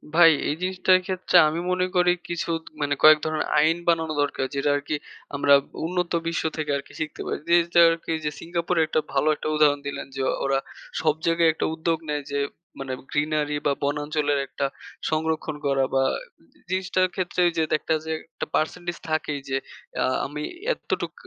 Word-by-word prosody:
ভাই 170 -1 +9 0.2
এই 150 - 0
জিনিসটার 185 0 +3
ক্ষেত্রে 185 0 -2
আমি 155 +2 -1
মনে 180 0 +2
করি 180 0 +5 0.2
কিছুত 170 -1 -2 0.2
মানে 145 0 +1
কয়েক 155 0 +9
ধরনের 155 0 -1
আইন 160 +3 +3
বানানো 160 -2 +2
দরকার; 145 -2 -1
যেটা 140 +1 +1
আরকি 145 +1 -2 0.4
আমরা 140 0 +4 0.3
উন্নত 180 0 -1 0.2
বিশ্ব 165 - -1
থেকে 155 -1 -3
আরকি 140 - -10
শিখতে 155 -1 -4
পারি। - - -3
জিনিসটা 170 0 +4
আরকি 165 0 -3
ওইযে 155 -1 -3
সিঙ্গাপুরে 170 0 -1
একটা - - +1
ভালো 140 +2 +2
একটা - - -5
উদাহরণ 150 -2 +4
দিলেন 140 - -4
যে, 135 - -2 0.2
ওরা 135 0 +2 0.4
সব 155 -2 +2
জায়গায় 165 0 +4
একটা - - -2
উদ্যোগ 165 0 0
নেয় 150 -1 -1
যে, 140 - 0 0.4
মানে 135 -1 -4 0.2
greenery 150 0 0
বা 145 - +3
বনাঞ্চলের 145 0 0
একটা 140 - -3 0.4
সংরক্ষণ 155 0 -1
করা 135 -1 +2
বা 135 - +4 0.5
এ - - -27
জিনিসটার 185 0 +1
ক্ষেত্রে 180 -1 -2
ওই 170 - 0
যে 160 - +3 0.2
একটা - - -1
যে 160 - -3 0.2
একটা - - -4
পার্সেন্টিজ 175 +2 -1
থাকেই 155 -2 -1
যে 135 - +1 0.5
আ - - +2 0.2
আমি 150 +2 -5 0.3
এতটুক - - -4
155 Hz, 175 wpm, -25 LUFS, 145-170 Hz, 0.5 s, ভাই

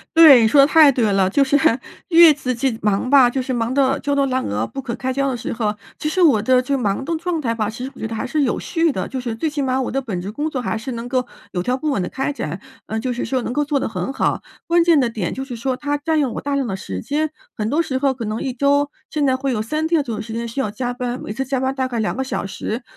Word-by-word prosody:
对， 305 -7 +9
你 220 - +4
说 280 +6 +4
的 275 - +6
太 305 -2 +7
对 230 -5 +1
了， 190 -1 +3
就 275 +8 +3
是 280 +2 +3 0.5
越 330 -2 +8
自 260 -3 -3
己 240 -1 -1
忙 210 +4 0
吧， 270 -3 +6
就 260 +2 -2
是 255 0 -3
忙 235 0 -1
得 275 0 +2
焦 285 0 -1
头 280 - +2
烂 260 -1 -1
额， 105 +2 -1
不 270 - -6
可 235 -2 -5
开 260 0 -3
交 275 +1 0
的 250 - -2
时 230 - -4
候 215 -2 -1 0.3
其 305 - -1
实 365 +3 0
我 280 -11 +5
的 255 +3 +3
这 265 +2 -3
个 - - 0
忙 205 +5 -1
的 330 +1 -1
状 340 0 -2
态 230 -5 -1
吧， 215 -2 -1
其 240 +3 -6
实 270 - -7
我 - - -15
觉 225 - -3
得 225 - -5
还 220 - -3
是 295 +4 0
有 265 - 0
序 330 -1 +1
的。 - - -3
就 265 - -4
是 235 -2 -4
最 305 +8 -1
起 295 -1 -3
码 260 -1 0
我 260 - -1
的 270 - -1
本 215 -9 -4
职 195 +4 -5
工 300 +7 -2
作 260 -4 -3
还 225 - -2
是 225 +4 -6
能 230 +1 -5
够 250 0 0 0.3
有 180 - -2
条 250 +6 0
不 305 +3 -2
紊 260 - 0
地 180 - -3
开 270 +2 -2
展， 175 - -5 0.3
呃， 220 +1 -2
就 250 +2 -2
是 245 - -3
说 260 -1 -1
能 245 - -3
够 295 - +1
做 290 -1 0
得 - - -2
很 190 +2 -3
好， - - 0 0.3
关 340 0 +4
键 335 -4 +5
的 245 -3 +2
点 210 -7 -3
就 265 - -5
是 250 -3 -6
说 255 +2 -2
它 290 0 -2
占 315 +2 0
用 265 -6 0
我 - - -4
大 285 -1 -2
量 275 -2 0
的 195 - -2
时 95 - -6
间， 310 +2 -1 0.3
很 215 -1 -2
多 300 +6 +2
时 270 -5 -2
候 270 0 +1
可 245 -3 -6
能 215 +1 -3
1 265 - -2
周 285 +3 +2 0.2
现 300 -2 0
在 260 -1 +3
会 270 -1 -1
有 215 - -1
3 305 +8 -2
天 325 -3 +2
左 230 -5 -4
右 - - -4
时 220 +1 -7
间 235 +1 -3
需 230 +4 -5
要 215 - 0
加 245 +3 -3
班， 250 0 -4
每 - - -6
次 265 +5 -3
加 265 0 -1
班 265 +1 0
大 260 -1 -1
概 240 -3 -3
2 215 - -1
个 265 - 0
小 265 - -3
时。 215 +4 -4
260 Hz, 330 characters per minute, -20 LUFS, 230-285 Hz, 0.5 s, 对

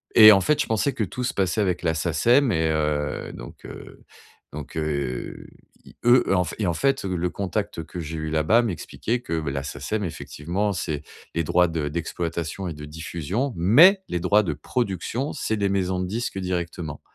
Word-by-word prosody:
Et 110 -1 +11
en 95 - +5
fait, 150 +10 +2
je - - 0
pensais 115 +5 +1
que 110 - -1
tout 125 +6 -4
se 125 - -1
passait 95 +2 +1
avec 90 -3 0
la 80 -2 +2
SACEM 115 - +3
et 80 -2 +1
heu, 75 -1 -1
donc, - - -11
heu, - - -11 0.5
donc, 75 0 -8
heu, 70 -5 -3 0.4
i - - -16
eux, 120 +1 +6
et - - +2
en 90 -1 +3
fait 85 - -6
et 105 - 0
en 85 - +1
fait, 135 +7 +1
le 90 -1 -1
contact 100 -2 -3
que 90 - -8
j'ai 80 0 -5
eu 80 0 -3
là-bas, 80 +10 +3
m'expliquait 115 +3 -3
que, 85 -9 -2
bah, 75 -3 -3
la 70 0 -3
SACEM, 75 +10 -3
effectivement, 90 +3 -3
c'est 75 -5 -3 0.3
les 85 - +1
droits 90 +3 +3
de 80 -3 -2
d'exploitation 85 +3 -3
et 85 - -4
de 75 0 -9
diffusion, 85 - -3
mais 150 - +6
les 90 - -1
droits 100 +4 +3
de 85 - -1
production, 115 - -2
c'est 110 - -1
les 100 -1 0
maisons 95 -1 0
de 90 - -2
disques 110 0 -3
directement. 85 -4 -4
90 Hz, 200 wpm, -24 LUFS, 80-105 Hz, 0.5 s, Et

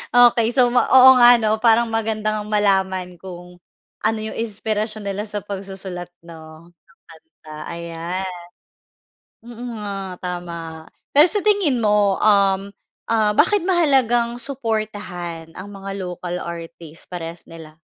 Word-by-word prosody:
Okey, 240 -2 +5
so 245 -1 +3
ma 245 - +2
oo 260 0 +9
nga 240 0 +9
'no 220 -1 0
parang 235 0 +4
maganda 215 -1 -1
ngang 210 0 -5
malaman 190 -3 +1
kung 180 -1 -11 0.4
ano 220 +1 +1
'yung 215 0 -5
inspirasyon 215 -1 -3
nila 200 0 -3
sa 205 0 -4
pagsusulat 190 -3 -7 0.2
'no 160 0 -13
ng 170 0 -30
kanta, 160 -1 -15
ayan. 170 +2 -5 1.1
Oo 240 0 -9 0.2
nga, 195 -3 -6
tama. 170 -3 -6 0.3
Pero, 295 +4 +8
sa 415 - 0
tingin 395 - +2
mo, 205 -2 +3
uhm, 200 -1 +3 0.4
ah 215 -2 +3
bakit 375 - +3
mahalagang 255 -9 +2
suportahan 210 - -4
ang 185 - -8
mga 195 0 -8
local 180 -1 -5
artist, 170 -1 -9
parehas 170 -1 -7
nila? 160 -1 -13
200 Hz, 130 wpm, -20 LUFS, 175-225 Hz, 1.1 s, oo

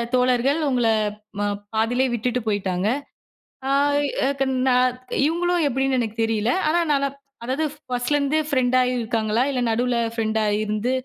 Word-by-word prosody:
தோழர்கள் 250 +3 +2
உங்கள 245 -3 +1 0.5
ம - - 0 0.3
பாதியிலே 240 +4 +1
விட்டுட்டு 245 +2 -1
போயிட்டாங்க. 195 -2 0 0.8
ஆய் 285 +1 +2 0.2
ஏக 275 0 0 0.3
நான் 250 0 +3 0.3
இவங்களு 350 +2 0
எப்படினு 265 0 0
எனக்கு 225 -2 -3
தெரியல. 225 0 +1 0.2
ஆனா 340 +3 +2
நனாப் 280 0 -1 0.3
அதாவது 265 +6 -1 0.3
1ஸ்ட்லருந்து 280 +4 +1
ஃப்ரெண்டாயி 255 -3 +2
இருக்காங்களா 225 0 0
இல்ல, 265 -2 -1
நடுவில 240 +2 +1 0.2
ஃப்ரெண்டா 220 -1 0 0.2
இருந்து 215 +3 -1
250 Hz, 125 wpm, -23 LUFS, 225-275 Hz, 0.8 s, நான்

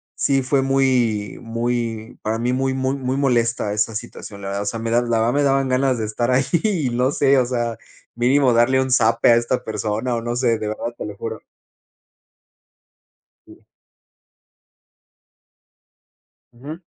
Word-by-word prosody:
sí, 135 -1 +1
fue 135 +1 +1
muy 125 -7 +1
muy, 115 -1 -3
para 110 +1 -1
mí, 120 +2 -1
muy 130 0 0
muy 130 +1 -1
muy 130 -1 -2
molesta 120 -6 +1
esa 105 +1 -1
situación, 105 -1 -8
la 100 - -5
verdad, 100 +1 -3
o - - -8
sea, 115 +2 -3
me 115 0 -3
da 120 +1 +3
la 120 -1 0
verdad 115 +2 +1
me 145 0 +2
daban 135 -1 +2
ganas 130 0 +1
de 110 - -2
estar 115 +3 -2
ahí 130 +2 +2 0.2
y 180 - 0
no 125 +3 +1
sé, 140 -1 +3
o 125 - +2
sea, 120 -2 -2 0.4
mínimo 125 +1 +3
darle 120 +3 +3
un 130 0 -1
zape 115 -1 +3
a - - +6
esta 120 +2 0
persona 110 +3 -2
o 115 - -2
no 120 +1 -3
sé, 120 -3 +1
de 105 - -3
verdad, 115 +2 -4
te - - -5
lo 105 -1 -7
juro. 110 +1 -6 2.0
Sí. - - -16 2.9
Ujú. 140 +7 -9
120 Hz, 170 wpm, -21 LUFS, 115-130 Hz, 2.9 s, a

